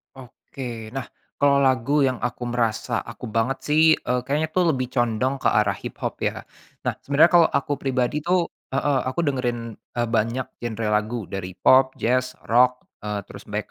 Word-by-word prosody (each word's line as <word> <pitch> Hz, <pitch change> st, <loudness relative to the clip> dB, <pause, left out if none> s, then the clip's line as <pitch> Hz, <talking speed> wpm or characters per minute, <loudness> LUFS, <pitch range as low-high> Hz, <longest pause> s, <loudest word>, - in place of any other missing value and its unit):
Oke. 120 Hz, -3 st, -9 dB
Nah, 135 Hz, -2 st, -4 dB, 0.3 s
kalau 140 Hz, -1 st, +3 dB
lagu 135 Hz, +2 st, +3 dB
yang 130 Hz, -2 st, 0 dB
aku 120 Hz, 0 st, -3 dB
merasa 120 Hz, -2 st, -1 dB
aku -, -, -8 dB
banget 115 Hz, +4 st, 0 dB
sih, 155 Hz, +2 st, +4 dB, 0.2 s
eee, 125 Hz, 0 st, -1 dB
kayaknya 150 Hz, +4 st, 0 dB
tuh 175 Hz, -3 st, +3 dB
lebih 130 Hz, -2 st, -2 dB
condong 120 Hz, +2 st, +1 dB
ke -, -, +3 dB
arah 105 Hz, -3 st, +2 dB
hiphop -, -, -5 dB
ya. -, -, -1 dB, 0.4 s
Nah, -, -, +1 dB
sebenarnya 145 Hz, +5 st, +4 dB
kalo 170 Hz, -2 st, +7 dB
aku 140 Hz, +1 st, 0 dB
pribadi 135 Hz, +1 st, -1 dB
tuh 175 Hz, 0 st, +2 dB, 0.2 s
heeh, 135 Hz, 0 st, +1 dB
aku 130 Hz, -, -4 dB
dengerin, 125 Hz, -4 st, 0 dB, 0.2 s
eee, 120 Hz, -1 st, -4 dB
banyak 115 Hz, +3 st, 0 dB, 0.2 s
genre 115 Hz, -2 st, -3 dB
lagu 105 Hz, +1 st, -1 dB
dari 95 Hz, -1 st, -5 dB
pop, 130 Hz, 0 st, +5 dB
jazz, 130 Hz, +2 st, +1 dB
rock, 125 Hz, +2 st, +3 dB, 0.2 s
eee, 105 Hz, -1 st, -2 dB
terus -, -, -11 dB
black -, -, -3 dB
125 Hz, 170 wpm, -23 LUFS, 115-140 Hz, 0.4 s, kalo